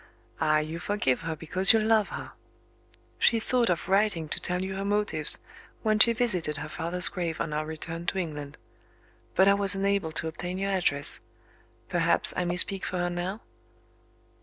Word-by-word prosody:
Ah, 155 Hz, -1 st, +2 dB
you 155 Hz, +2 st, -4 dB
forgive 175 Hz, -10 st, -2 dB
her 165 Hz, -1 st, -5 dB
because 185 Hz, +6 st, +4 dB
you 225 Hz, -, +3 dB
love 215 Hz, -1 st, +1 dB
her! -, -, -8 dB, 0.9 s
She 230 Hz, -, +2 dB
thought 240 Hz, +1 st, 0 dB
of 175 Hz, -1 st, -2 dB
writing 195 Hz, -4 st, 0 dB
to -, -, -2 dB
tell 180 Hz, +1 st, 0 dB
you 190 Hz, 0 st, -5 dB
her 195 Hz, -, -4 dB
motives, 205 Hz, -6 st, +4 dB, 0.5 s
when 215 Hz, -1 st, 0 dB
she 235 Hz, -, +8 dB
visited 185 Hz, -11 st, -1 dB
her -, -, -7 dB
father's 175 Hz, +2 st, +5 dB
grave 170 Hz, -3 st, -4 dB
on 155 Hz, -, -4 dB
our 155 Hz, +1 st, -3 dB
return 165 Hz, +2 st, -6 dB
to -, -, -2 dB
England. 150 Hz, -5 st, -6 dB, 0.8 s
But 190 Hz, -, +4 dB
I 200 Hz, -, +5 dB
was 200 Hz, -1 st, +5 dB
unable 195 Hz, -4 st, -1 dB
to 160 Hz, -, -4 dB
obtain 175 Hz, +3 st, -6 dB
your 195 Hz, +1 st, -3 dB
address. 160 Hz, -7 st, 0 dB, 0.7 s
Perhaps, 170 Hz, +5 st, +1 dB
I 180 Hz, -, -2 dB
may 175 Hz, 0 st, -2 dB
speak 190 Hz, +1 st, +3 dB
for 180 Hz, -, -4 dB
her 175 Hz, 0 st, -2 dB
now?" 180 Hz, +5 st, -5 dB
180 Hz, 180 wpm, -26 LUFS, 160-200 Hz, 0.9 s, she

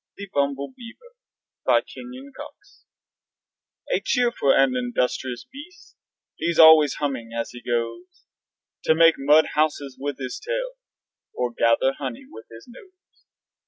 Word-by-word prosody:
THE 200 Hz, -, -8 dB
BUMBLEBEAVER 230 Hz, -, -4 dB, 0.5 s
BY -, -, +4 dB
KENYON 255 Hz, +3 st, -11 dB
COX -, -, -13 dB, 1.1 s
A -, -, +2 dB
cheerful 240 Hz, -, +1 dB
and 135 Hz, -1 st, +3 dB
industrious 125 Hz, 0 st, -2 dB
beast, 360 Hz, +7 st, -13 dB, 0.4 s
He's 170 Hz, -1 st, -2 dB
always 160 Hz, -3 st, +7 dB
humming 130 Hz, -6 st, -4 dB
as 115 Hz, -, -3 dB
he 120 Hz, -, -11 dB
goes 115 Hz, 0 st, -4 dB, 0.6 s
To 160 Hz, -, +4 dB
make 165 Hz, 0 st, +6 dB
mud 150 Hz, +3 st, +4 dB
houses 145 Hz, -3 st, -1 dB
with 145 Hz, 0 st, -4 dB
his 130 Hz, -2 st, -6 dB
tail -, -, -3 dB, 0.6 s
Or 125 Hz, -1 st, -2 dB
gather 115 Hz, +3 st, +2 dB
honey 130 Hz, -5 st, -6 dB
with 110 Hz, 0 st, -13 dB
his 115 Hz, 0 st, -14 dB
nose. 370 Hz, +9 st, -19 dB
145 Hz, 125 wpm, -23 LUFS, -, 1.1 s, always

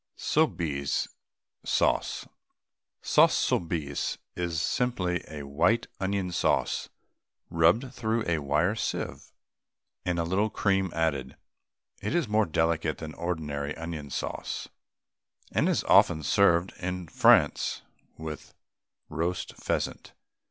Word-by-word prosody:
SOUBISE 80 Hz, -, 0 dB, 0.5 s
SAUCE. -, -, +1 dB, 0.8 s
Sauce -, -, +5 dB
Soubise 80 Hz, -5 st, -1 dB, 0.2 s
is 85 Hz, -2 st, -1 dB
simply 90 Hz, -3 st, 0 dB, 0.2 s
white 85 Hz, +12 st, +2 dB
onion 95 Hz, -1 st, -1 dB
sauce, 85 Hz, -, 0 dB, 0.6 s
rubbed 90 Hz, +11 st, +3 dB
through 115 Hz, -2 st, -1 dB
a 85 Hz, -2 st, +1 dB
wire 75 Hz, +7 st, +1 dB
sieve, 110 Hz, -, -4 dB, 0.7 s
and 90 Hz, -1 st, -1 dB
a 85 Hz, -, +1 dB
little 95 Hz, +6 st, +1 dB
cream 95 Hz, -3 st, +1 dB
added. 70 Hz, -6 st, -1 dB, 0.7 s
It 105 Hz, +11 st, -2 dB
is 170 Hz, -7 st, +1 dB
more 105 Hz, -1 st, +2 dB
delicate 80 Hz, -1 st, +1 dB
than 80 Hz, -1 st, -7 dB
ordinary 75 Hz, -4 st, -3 dB
onion 80 Hz, -3 st, -6 dB
sauce, -, -, -4 dB, 0.8 s
and -, -, +2 dB
is -, -, +1 dB
often 80 Hz, -, +5 dB
served 90 Hz, +1 st, +3 dB
in 90 Hz, -1 st, -4 dB
France -, -, +4 dB, 0.3 s
with 80 Hz, -1 st, -8 dB, 0.5 s
roast 85 Hz, +3 st, -3 dB
pheasant. -, -, -3 dB
85 Hz, 105 wpm, -28 LUFS, 80-95 Hz, 0.8 s, Sauce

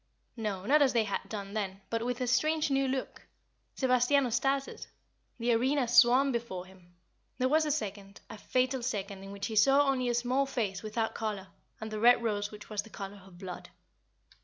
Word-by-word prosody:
No, 205 Hz, -5 st, -4 dB
not 295 Hz, +6 st, +4 dB
as 275 Hz, -2 st, +4 dB
they 230 Hz, -2 st, +3 dB
had 200 Hz, -2 st, -2 dB
done 200 Hz, -2 st, -6 dB
then, 195 Hz, -2 st, -3 dB
but 230 Hz, 0 st, -1 dB
with 245 Hz, +1 st, -3 dB
a -, -, +1 dB
strange 305 Hz, +5 st, +1 dB
new 270 Hz, 0 st, +2 dB
look. 260 Hz, 0 st, -4 dB, 0.5 s
Sebastiano 255 Hz, 0 st, +2 dB
started; 270 Hz, +3 st, -1 dB, 0.5 s
the 240 Hz, 0 st, +1 dB
arena 260 Hz, +3 st, +1 dB
swam 250 Hz, +3 st, +5 dB
before 230 Hz, -7 st, -4 dB
him; 185 Hz, -2 st, -19 dB, 0.4 s
there 255 Hz, -, +1 dB
was 310 Hz, +3 st, +3 dB
a -, -, +1 dB
second 200 Hz, -7 st, -4 dB
a -, -, -9 dB
fatal 255 Hz, +2 st, 0 dB
second 200 Hz, -5 st, -4 dB
in 195 Hz, -, -9 dB
which 200 Hz, 0 st, -5 dB
he 220 Hz, -, -4 dB
saw 275 Hz, +6 st, +5 dB
only 255 Hz, -2 st, +1 dB
a 240 Hz, -, +1 dB
small 255 Hz, +3 st, +1 dB
face 210 Hz, -8 st, -2 dB
without 220 Hz, +1 st, -2 dB
color 205 Hz, -4 st, -4 dB, 0.3 s
and 220 Hz, 0 st, -6 dB
the 215 Hz, -, -3 dB
red 240 Hz, +1 st, +5 dB
rose 205 Hz, -2 st, -1 dB
which 210 Hz, -1 st, -11 dB
was 215 Hz, -2 st, -2 dB
the 220 Hz, -, -15 dB
color 200 Hz, -1 st, -8 dB
of 180 Hz, -2 st, -16 dB
blood. 185 Hz, -1 st, -8 dB
235 Hz, 195 wpm, -30 LUFS, 205-260 Hz, 0.5 s, swam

